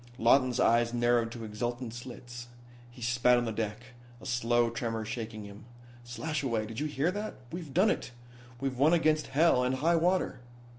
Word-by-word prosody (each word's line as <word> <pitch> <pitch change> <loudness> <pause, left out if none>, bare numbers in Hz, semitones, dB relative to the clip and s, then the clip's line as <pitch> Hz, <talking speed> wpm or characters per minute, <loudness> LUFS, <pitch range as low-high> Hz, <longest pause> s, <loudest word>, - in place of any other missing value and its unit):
Lawton's 125 +1 +3
eyes 115 +1 +3
narrowed 120 -1 +2
to 115 -1 -7
exultant 120 +2 -4
slits. 120 -1 -9 0.4
He 120 0 -11
spat 120 +1 +3
on 120 - 0
the 115 - -2
deck, 110 +3 -5 0.3
a - - -13
slow 120 -1 +1
tremor 115 -1 -3
shaking 110 -1 -5
him. 100 +2 -12 0.4
"Slashaway, 120 -1 -2
did 110 +1 -6
you 150 - -1
hear 150 +3 0
that? 210 +2 -5 0.2
We've 170 -4 -6
done 190 +8 +4
it. - - -3 0.5
We've 130 -1 -3
won 150 +4 +5
against 155 -2 +2
hell 145 -3 +3
and 125 +1 +1
high 165 +6 +2
water." 180 -3 +1
120 Hz, 170 wpm, -30 LUFS, 115-140 Hz, 0.5 s, won